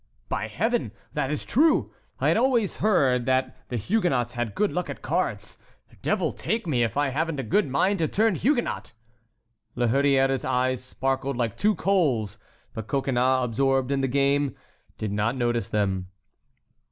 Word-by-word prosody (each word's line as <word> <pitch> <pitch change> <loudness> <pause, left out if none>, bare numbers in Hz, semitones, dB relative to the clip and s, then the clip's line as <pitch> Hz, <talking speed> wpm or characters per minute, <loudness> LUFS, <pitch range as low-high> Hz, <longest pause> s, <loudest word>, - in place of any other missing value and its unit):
"By 110 - -2
Heaven! 155 - -1 0.2
that 135 - -1
is 150 - -3
true! 310 +5 +2 0.3
I - - +3
always 235 -4 +1
heard 135 - +2
that 130 0 +1
the 125 - -3
Huguenots 130 - 0
had 120 -4 -3
good 210 - +1
luck 180 - -2
at - - -7
cards. - - -2 0.4
Devil - - 0
take 225 0 -2
me 135 -8 +1
if 115 +2 0
I 145 -1 +2
haven't 155 +2 -2
a - - -2
good 195 - +1
mind 185 +9 +1
to 160 - +2
turn 220 +4 +2
Huguenot!" 240 - -1 0.8
La 120 - +1
Hurière's 135 +1 +2
eyes 130 0 0
sparkled 135 +1 -2
like 115 -4 -1
two 210 0 +2
coals; 140 - +1 0.3
but 110 -1 -6
Coconnas, 130 -1 +1
absorbed 135 +2 +1
in 140 -1 +1
his 135 - 0
game, 140 0 +1 0.4
did 110 -2 -3
not 105 +4 0
notice 120 -1 0
them. 95 -3 -1
135 Hz, 160 wpm, -25 LUFS, 120-175 Hz, 0.8 s, I